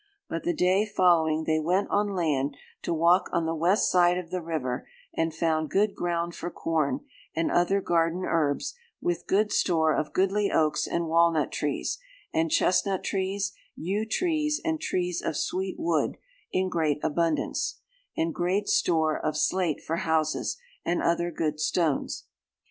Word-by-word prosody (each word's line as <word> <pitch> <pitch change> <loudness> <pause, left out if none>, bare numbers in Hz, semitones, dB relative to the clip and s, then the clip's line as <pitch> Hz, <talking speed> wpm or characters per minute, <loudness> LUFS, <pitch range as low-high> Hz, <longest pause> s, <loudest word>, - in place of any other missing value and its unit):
But 165 - -3
the 175 - 0
day 185 +4 +3
following 170 -6 +3
they 155 0 +1
went 180 +6 +1
on 205 -1 +1
land, 145 -5 0 0.2
'to - - -3
walk 170 +3 +3
on 170 -1 +1
the 165 - 0
west 175 +6 +2
side 175 -1 +4
of 180 -2 -6
the 185 - -2
river, 155 -7 -3 0.3
and 165 0 0
found 160 -1 0
good 205 +1 +2
ground 170 -1 -2
for 175 - -5
corn, 165 - -1 0.3
and 165 - 0
other 195 +3 +2
garden 170 0 +1
herbs, 150 -4 0 0.3
with 175 -1 -2
good 210 +2 +2
store 160 -5 +2
of 150 - -1
goodly 195 +2 +2
oaks 155 -1 +2
and 170 0 -1
walnut 165 -2 +3
trees, 145 - -2 0.3
and 160 0 +1
chestnut 190 +3 +2
trees, 195 +1 -1 0.2
yew 200 +6 -2
trees, 305 +2 0
and 320 -1 0
trees 180 - -1
of 155 - -2
sweet 190 0 -2
wood, 165 -3 0 0.3
in 185 0 +1
great 160 -5 +1
abundance, 165 +1 0 0.4
and 165 0 0
great 185 +4 0
store 160 -3 +2
of 155 0 -1
slate 175 0 +1
for 165 - -2
houses, 160 - 0 0.3
and 175 - 0
other 170 +1 +1
good 155 -2 -2
stones. 155 -3 0
170 Hz, 160 wpm, -27 LUFS, 160-185 Hz, 0.4 s, side